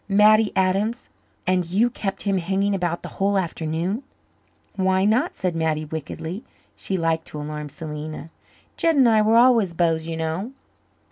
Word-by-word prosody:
"Mattie 210 +2 +5
Adams! 195 +5 0 0.4
And 185 0 +2
you 200 +8 +1
kept 195 -4 -3
him 195 -2 +1
hanging 195 +3 0
about 175 -3 -2
the - - -6
whole 200 +1 +2
afternoon." 170 - -2 0.7
"Why 190 0 +2
not?" 245 - +2
said 180 -3 -2
Mattie 160 -1 0
wickedly. 160 - -6 0.3
She 190 - -3
liked 165 -1 0
to 150 - -7
alarm 150 0 -5
Selena. 155 +1 -7 0.5
"Jed 330 -1 +2
and 265 -3 +5
I 220 -2 +5
were 220 +2 +4
always 230 -8 +4
beaus, 165 -1 +1
you 165 -1 -4
know." 165 +10 -3
185 Hz, 155 wpm, -23 LUFS, 160-210 Hz, 0.7 s, Mattie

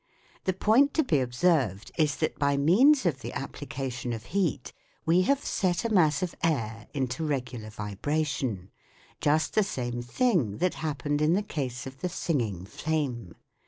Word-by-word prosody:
The 190 - +2
point 235 +9 +3
to 315 - +4
be 150 - +2
ob 125 -1 -3
served 125 - +1
is 150 -3 +2
that 155 - -2
by 140 -1 +2
means 230 - +5
of 150 -7 +1
the - - -6
application 130 -3 -4
of 110 -1 -6
heat 170 -10 0 0.3
we 170 +3 +4
have 280 0 +2
set 180 +1 0
a - - +1
mass 160 -3 +4
of 180 - -2
air 115 -9 -1
into 130 +1 -2
regular 125 -7 -3
vibration: 110 - -2 0.5
just 155 +1 +2
the 215 - +4
same 120 -11 -3
thing 125 - +1
that 180 +1 +1
happened 145 -1 -1
in 155 +2 +4
the 200 +3 +1
case 130 - -4
of 130 0 -9
the 180 - -1
singing 115 - -2
flame. 125 - -3
145 Hz, 165 wpm, -28 LUFS, 120-175 Hz, 0.5 s, means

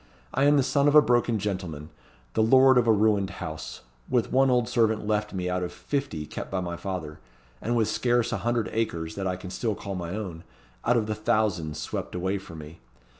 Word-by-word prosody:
I 135 - +2
am 145 0 +5
the 140 - +4
son 140 +2 +2
of 145 - +4
a 150 - +10
broken 120 -3 +2
gentleman; 90 -7 -4 0.4
the - - +2
lord 130 +3 +6
of 120 - +1
a - - +6
ruined 105 -2 +3
house; - - -6 0.3
with 120 -2 +1
one 135 +1 +4
old 125 -2 +2
servant 110 -2 +1
left 105 0 0
me 90 -1 -3
out 90 0 -1
of 90 - -3
fifty 135 - -3
kept - - -7
by 95 - -1
my 85 -1 -3
father, 85 -4 -5 0.4
and 120 +2 -1
with 110 -3 +2
scarce 120 -1 +1
a - - 0
hundred 120 -3 0
acres 85 -8 -2
that 95 -1 -3
I 90 - -1
can 90 0 -8
still 110 +1 -1
call 100 0 -6
my 90 0 -4
own, 90 -6 -6 0.4
out 120 +1 +3
of 110 - +1
the 110 - -2
thousands 100 -8 0
swept 75 - -5
away 95 +2 -1
from 85 -3 -11
me. 80 +2 -10
105 Hz, 220 wpm, -26 LUFS, 90-120 Hz, 0.4 s, a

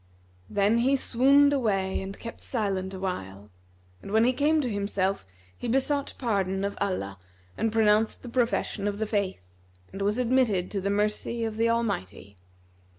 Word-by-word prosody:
Then 205 +3 +2
he 265 +3 +3
swooned 275 +3 +4
away 195 -8 0
and 195 +1 -7
kept 230 - -9
silent 195 -5 -2
awhile; 105 - -5 0.5
and, - - -9
when 220 +1 +4
he 250 +2 +3
came 300 +4 +2
to 260 - -2
himself, 200 - -1 0.3
he 245 - -6
besought 270 +3 0
pardon 195 -5 -1
of 200 - -3
Allah 100 - -2 0.4
and 225 0 0
pronounced 220 0 +2
the - - -8
profession 235 -4 0
of 205 -1 -2
the 220 - -1
Faith, 200 - -2 0.5
and 195 - -6
was 205 +3 +1
admitted 240 -7 +2
to 200 - -2
the 200 - -1
mercy 210 +3 -1
of 220 -1 -2
the 230 +1 +2
Almighty. 150 - -2
210 Hz, 160 wpm, -27 LUFS, 195-235 Hz, 0.5 s, swooned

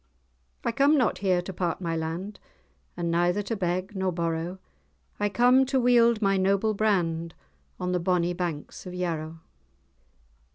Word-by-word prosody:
"I - - +2
come 280 +5 +4
not 250 -5 +1
here 185 -2 +1
to 190 - -6
part 175 -2 -2
my 165 -3 -2
land, 165 +6 -4 0.6
And 170 -1 -1
neither 175 +4 +1
to 225 - -3
beg 185 +1 -2
nor 190 -1 0
borrow, 170 +1 -2 0.6
I 205 0 +1
come 250 +5 +4
to 270 0 +1
wield 235 -2 +4
my 195 0 +3
noble 195 +3 +2
brand 170 -6 0 0.4
On 180 0 -2
the 180 - +1
bonnie 175 0 +1
banks 175 -1 -5
of 180 - -7
Yarrow. 165 -2 -3
185 Hz, 155 wpm, -27 LUFS, 170-210 Hz, 0.6 s, come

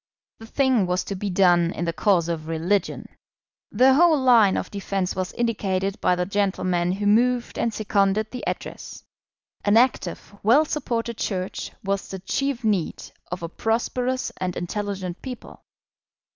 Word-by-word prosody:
The 225 - -11
thing 255 -6 +2
was 180 +1 0
to 200 - -5
be 200 +2 -3
done 175 -2 +4
in 170 - -3
the 170 - -1
cause 175 -2 +2
of 160 -2 -4
religion. 170 +5 -1 0.7
The 260 +1 +5
whole 320 +1 +5
line 235 -7 +5
of - - -4
defence 195 -2 -2
was 185 -1 -3
indicated 195 -4 -1
by 180 - +3
the 180 0 -1
gentlemen 185 -3 0
who 205 +2 -3
moved 240 +4 +2
and 235 - +1
seconded 210 0 0
the 250 - -6
Address. - - -6 0.6
An 205 +2 +4
active, 240 -4 +1
well 250 +9 +5
supported 235 -6 -3
Church 185 -2 -3
was 195 0 -2
the 190 - -6
chief 265 +7 -2
need 200 -7 -1 0.2
of 180 -1 -4
a - - -2
prosperous 245 +6 -1
and 180 -1 -3
intelligent 190 -1 -4
people. 255 -3 -9
200 Hz, 155 wpm, -24 LUFS, 185-235 Hz, 0.7 s, The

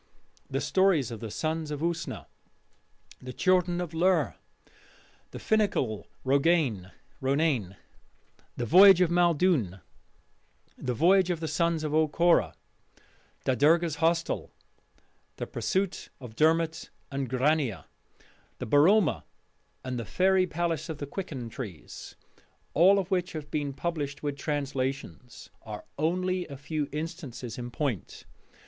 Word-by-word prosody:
The - - -2
stories 185 - +2
of 115 - -6
the 115 - -6
Sons 155 +8 -2
of 150 -1 -4
Usna, 170 0 -3 1.0
the 130 - -7
Children 180 +3 +2
of 175 -2 -4
Lir, 165 - +2 1.0
the - - -9
Fingal 200 - 0 0.2
Ronain, 135 - +2 1.7
the 120 - -2
Voyage 190 - +8
of 175 -2 +3
Maeldune, 170 - +2 1.0
The 125 -2 -3
Voyage 185 +6 +4
of 175 -3 -1
the 160 - -3
Sons 170 -1 0
of 150 -1 -2
O'Corra, 155 - +3 0.9
Da 130 - +2
Derga's 160 +5 +3
Hostel, 165 +1 0 0.9
The - - -4
Pursuit 190 -1 -2
of 125 -4 -10
Dermot 160 +2 +1 0.2
and 135 -2 -3
Grania, 130 - 0 0.7
the - - -5
Boroma, 160 - +4 0.6
and 125 -1 -4
the 115 - -5
Fairy 185 0 +4
Palace 170 0 -2
of 160 - -4
the 145 - -5
Quicken 140 -5 -6
Trees 110 - -9 0.6
all 185 +6 +6
of 195 0 -2
which 180 -1 0
have 150 -2 -7
been 145 -2 -1
published 145 -1 -4
with 145 -1 -2
translations 135 - -4
are 105 -2 -8
only 180 +3 0
a 140 - -8
few 145 +1 -3
instances 150 -7 -6
in 120 0 -5
point. 125 - -4
155 Hz, 125 wpm, -28 LUFS, 130-175 Hz, 1.7 s, Voyage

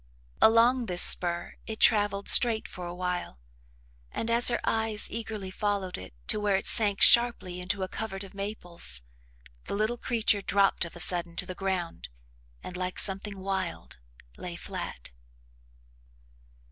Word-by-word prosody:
Along 235 +2 +3
this 180 -2 +7
spur 175 -1 +4
it 220 -1 -7
travelled 205 -2 +2
straight 230 -3 +6
for 180 -1 -9
a 175 - -8
while 180 - -5 0.7
and, 230 - -4
as 235 +1 +5
her 240 - +2
eyes 220 -1 0
eagerly 215 -4 -6
followed 200 -2 -3
it 95 -10 -11
to - - +3
where 205 -1 0
it 190 - -3
sank 205 -3 +2
sharply 235 -7 +4
into 190 +2 -3
a - - -3
covert 195 0 -6
of 195 - -13
maples, 175 - -3 0.6
the - - -5
little 215 +3 -2
creature 220 -3 +1
dropped 195 -2 +1
of 170 - -11
a - - -10
sudden 170 0 0
to - - 0
the 185 - -7
ground 180 - -5 0.5
and, 180 - -9
like 185 0 -5
something 195 +1 -1
wild, 190 - -6 0.4
lay 175 -1 -8
flat. 60 - -8
195 Hz, 150 wpm, -27 LUFS, 180-220 Hz, 0.7 s, this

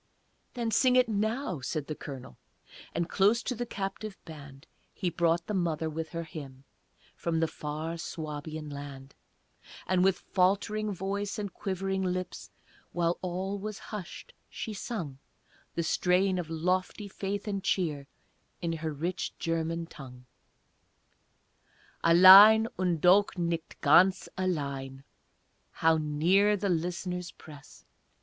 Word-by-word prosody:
"Then 235 -2 -2
sing 255 +2 +4
it 255 -1 +5
now," 220 - -1
said 150 +3 -3
the 155 - -4
Colonel, 135 -4 -9 0.6
And 170 0 0
close 205 +6 +3
to - - -2
the 240 0 -4
captive 200 -1 -5
band 145 -3 -11 0.3
He 180 -3 -2
brought 170 0 +1
the 210 - -4
mother 165 -4 -1
with 160 +1 -4
her 170 0 -4
hymn 140 -5 -10 0.5
From 165 -1 -1
the 165 - +2
far 155 +3 -5
Suabian 155 -1 -6
land; 140 -1 -9 0.7
And 185 -1 +2
with 190 -1 +3
faltering 205 +3 0
voice 200 +2 -3
and 205 -4 -4
quivering 195 0 -2
lips, 185 -1 -3 0.4
While 170 0 0
all 190 +2 -3
was 210 0 -5 0.2
hushed, 190 -4 -7 0.2
she 220 - -5
sung 175 - -5 0.6
The 170 - 0
strain 185 +3 +2
of 165 -3 -5
lofty 185 +5 -1
faith 200 +1 -4
and 200 -2 -2
cheer 150 -7 -1 0.5
In 170 -2 -2
her 160 -1 -3
rich 165 +5 -4
German 165 0 -2
tongue: 130 -6 -12 1.8
"Allein, 195 +6 +9
und 175 -4 0
doch 195 +2 +4
nicht 170 -2 -3
ganz 180 +6 +5
allein" 140 -7 -3 0.7
(How 165 0 +2
near 175 +8 +3
the 200 +1 -1
listeners 180 +1 -2
press!) 145 -3 -14
175 Hz, 130 wpm, -29 LUFS, 155-195 Hz, 1.8 s, Allein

